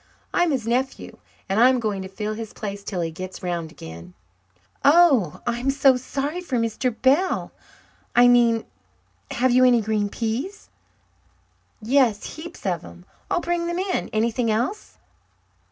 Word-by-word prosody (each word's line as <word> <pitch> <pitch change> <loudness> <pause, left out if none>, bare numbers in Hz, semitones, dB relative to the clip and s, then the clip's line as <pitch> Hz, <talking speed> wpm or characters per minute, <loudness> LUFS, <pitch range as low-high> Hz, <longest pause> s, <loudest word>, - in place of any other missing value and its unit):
I'm 350 -1 +3
his 260 -7 -1
nephew, 255 +3 -2 0.3
and 195 +3 0
I'm 255 +2 +5
going 210 -4 -2
to 190 - -6
fill 210 +3 -4
his 220 0 -7
place 200 -1 -6
till 185 -3 -3
he 165 -1 -2
gets 185 +3 -8
'round 170 -3 -3
again." 85 - -11 0.7
"Oh, 285 - +4
I'm 240 +2 -1
so 270 -1 +4
sorry 280 +6 -3
for 270 -8 -2
Mr. 230 +1 -1
Bell, 295 +9 +2 0.6
I 245 0 +7
mean. 235 -2 +4 0.6
Have 255 +1 +1
you 255 +1 +5
any 250 -2 +5
green 210 -1 -1
peas?" 250 - -4 1.1
"Yes, 235 -3 +1
heaps 335 -3 -10
of 175 -4 -1
them. 85 0 -13 0.2
I'll 350 - +1
bring 345 0 -1
them 345 0 -2
in. 375 0 -2
Anything 230 +2 0
else?" 240 - -2
235 Hz, 150 wpm, -23 LUFS, 205-275 Hz, 1.1 s, I